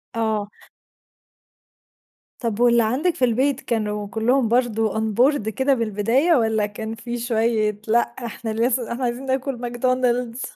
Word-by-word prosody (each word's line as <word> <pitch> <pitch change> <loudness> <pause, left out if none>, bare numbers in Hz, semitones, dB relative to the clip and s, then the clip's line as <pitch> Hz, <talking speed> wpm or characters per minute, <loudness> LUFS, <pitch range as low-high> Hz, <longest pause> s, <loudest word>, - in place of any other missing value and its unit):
آه. 215 -2 -1 1.9
طب 230 -3 -2
واللي 235 -1 +4
عندِك 290 +10 0
في 255 - +2
البيت 260 +3 +1
كانوا 210 -2 -2
كلّهم 230 +4 +1
برضو 225 -2 +1
onboard 220 +2 +1
كده 265 +6 +1
بالبداية 230 - +1
والّا 220 -5 +2
كان 220 +2 -6
في 240 +1 -5
شوية 220 -3 0
لأ 235 +2 +4
إحنا 235 -1 -5
لسه 235 +1 0
إحنا 245 +2 -3
عايزين 245 +2 -2
ناكل 265 0 -1
ماكدونالدز؟ 245 0 -1
235 Hz, 130 wpm, -22 LUFS, 220-255 Hz, 1.9 s, واللي